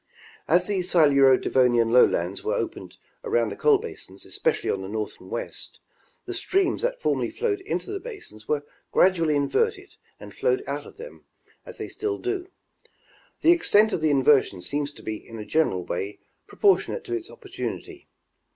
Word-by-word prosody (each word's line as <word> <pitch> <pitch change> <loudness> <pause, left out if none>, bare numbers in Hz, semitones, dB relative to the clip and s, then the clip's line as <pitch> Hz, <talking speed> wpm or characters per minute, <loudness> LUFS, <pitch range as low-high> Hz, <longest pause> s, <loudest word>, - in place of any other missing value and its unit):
As 175 +4 +3
the 205 -2 -1
Siluro 140 -7 +5
Devonian 120 -3 +3
lowlands 125 - +3
were 445 +4 0
opened - - -5 0.3
around 470 0 +1
the - - -6
coal 440 -2 +4
basins, 455 +3 -9
especially 480 -2 -1
on 95 - -2
the 95 - -6
north 105 0 -4
and 95 - -13
west, 120 - -6 0.5
the - - -5
streams 375 -2 0
that - - -1
formerly - - 0
flowed 420 -4 -1
into 390 0 -4
the 400 - -3
basins 390 - -10
were 145 -1 -1 0.3
gradually 165 -5 +3
inverted 440 - 0 0.3
and - - -11
flowed 405 -5 0
out - - -4
of - - -15
them, 485 +2 -11 0.4
as - - -10
they - - -5
still 420 -2 -3
do. 375 -1 -3 0.9
The 335 - +6
extent 220 -11 +4
of - - -1
the 155 - +2
inversion 135 -9 +3
seems 145 +7 -2
to 145 - -15
be 110 -1 -4
in 115 - -12
a 105 - -7
general 95 - +1
way 100 +4 -4 0.3
proportionate 415 +3 +2
to 365 -4 -6
its 360 0 -3
opportunity. 380 -3 -7
185 Hz, 170 wpm, -25 LUFS, -, 0.9 s, The